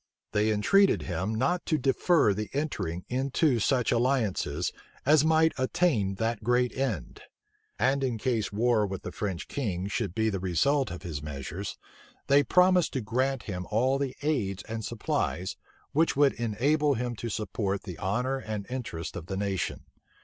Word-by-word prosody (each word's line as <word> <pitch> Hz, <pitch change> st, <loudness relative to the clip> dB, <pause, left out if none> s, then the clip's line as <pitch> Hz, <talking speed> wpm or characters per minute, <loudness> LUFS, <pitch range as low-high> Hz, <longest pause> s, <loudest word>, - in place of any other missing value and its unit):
They 105 Hz, +1 st, +2 dB
entreated 195 Hz, -, +4 dB
him 95 Hz, +5 st, -2 dB
not 140 Hz, +10 st, +1 dB
to 155 Hz, -, +2 dB
defer 135 Hz, -, +3 dB
the 105 Hz, +1 st, -4 dB
entering 95 Hz, -, -2 dB
into 130 Hz, +1 st, +1 dB
such 125 Hz, +2 st, +2 dB
alliances 115 Hz, -, +1 dB, 0.3 s
as 150 Hz, +1 st, +5 dB
might 160 Hz, 0 st, +4 dB
attain 130 Hz, -, +1 dB
that 115 Hz, +1 st, -2 dB
great 125 Hz, +2 st, +2 dB
end; 115 Hz, -, -3 dB, 0.6 s
and 135 Hz, +1 st, +2 dB
in 125 Hz, -4 st, 0 dB
case 110 Hz, -4 st, -1 dB
war 110 Hz, 0 st, +2 dB
with 95 Hz, -1 st, -6 dB
the -, -, -5 dB
French 95 Hz, -5 st, -4 dB
king 95 Hz, -10 st, -2 dB
should 100 Hz, -3 st, -2 dB
be 110 Hz, 0 st, +1 dB
the 95 Hz, -, -2 dB
result 130 Hz, -, +1 dB
of 90 Hz, +1 st, -7 dB
his 80 Hz, -5 st, -5 dB
measures, 75 Hz, +6 st, -5 dB, 0.5 s
they 140 Hz, +1 st, +5 dB
promised 180 Hz, +1 st, +4 dB
to 130 Hz, -, -1 dB
grant 130 Hz, +4 st, 0 dB
him 90 Hz, -3 st, -5 dB
all 130 Hz, +5 st, +2 dB
the 135 Hz, -2 st, -2 dB
aids 105 Hz, -11 st, -1 dB
and 115 Hz, 0 st, -5 dB
supplies, 95 Hz, -5 st, -2 dB, 0.4 s
which 160 Hz, +3 st, +2 dB
would 140 Hz, 0 st, +4 dB
enable 140 Hz, +6 st, +1 dB
him 120 Hz, 0 st, -2 dB
to 120 Hz, -, -4 dB
support 100 Hz, -2 st, -2 dB
the 90 Hz, -5 st, -8 dB
honor 125 Hz, +8 st, 0 dB
and 110 Hz, -5 st, -5 dB
interest 115 Hz, -11 st, -5 dB
of 85 Hz, -1 st, -7 dB
the 95 Hz, -, -3 dB
nation. 95 Hz, -4 st, -2 dB
115 Hz, 165 wpm, -28 LUFS, 100-135 Hz, 0.6 s, as